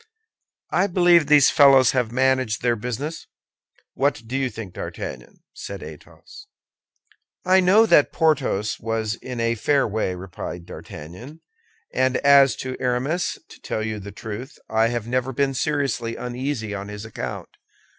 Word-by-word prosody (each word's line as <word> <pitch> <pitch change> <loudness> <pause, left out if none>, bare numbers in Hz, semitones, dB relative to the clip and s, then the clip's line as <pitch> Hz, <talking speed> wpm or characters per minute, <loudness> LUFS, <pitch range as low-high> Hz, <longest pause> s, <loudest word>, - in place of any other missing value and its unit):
"I 185 +3 +2
believe 175 -4 +4
these 150 -3 +6
fellows 135 -3 +6
have 125 -4 0
managed 130 -3 +1
their 120 -1 +2
business. 125 +8 -5 0.7
What 140 -3 0
do 120 +4 -5
you 135 -1 0
think, 105 -5 -8
D'Artagnan?" - - -8
said - - -8
Athos. 410 - -13 1.0
"I 185 +1 +5
know 190 +5 +5
that 150 -9 +4
Porthos 135 - 0
was 110 -1 -2
in 125 +1 -7
a 115 0 +1
fair 135 +5 +1
way," 105 -3 -2
replied 90 -1 -7
D'Artagnan; 105 - -10 0.5
"and 130 0 +2
as 140 -4 +5
to 130 0 -4
Aramis 130 +8 -1
to - - -15
tell 110 - -3
you 110 -1 -4
the 100 0 -9
truth, 110 +6 -8
I 110 +1 +2
have 120 -2 -3
never 130 +2 -1
been 135 +1 0
seriously 135 -5 -1
uneasy 125 -3 -4
on 100 0 -5
his 105 +1 -8
account. 110 - -6
125 Hz, 145 wpm, -23 LUFS, 110-140 Hz, 1.0 s, these